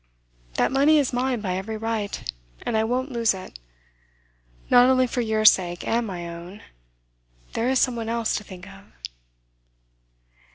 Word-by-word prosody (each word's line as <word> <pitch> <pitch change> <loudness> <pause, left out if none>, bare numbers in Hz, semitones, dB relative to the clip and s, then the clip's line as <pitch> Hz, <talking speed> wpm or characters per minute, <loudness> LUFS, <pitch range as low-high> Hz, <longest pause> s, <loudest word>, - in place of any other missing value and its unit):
That - - +2
money 285 +4 +4
is 280 -4 +1
mine 250 -1 0
by 185 -3 -2
every 215 +3 -4
right, 215 - -3 0.3
and 230 - -2
I 220 - +2
won't 255 +4 -1
lose 230 -4 +1
it. 185 - -10 1.1
Not 245 +1 +6
only 255 -1 +4
for 245 0 -2
your 220 -1 0
sake 175 -4 +4
and 230 0 0
my 175 -3 -5
own 170 +4 -9 0.9
there 235 +2 0
is 265 - +2
some 250 -1 +2
one 225 -1 -4
else 230 -1 0
to 210 - -6
think 185 -1 -11
of. 195 0 -14
225 Hz, 160 wpm, -24 LUFS, 195-245 Hz, 1.1 s, Not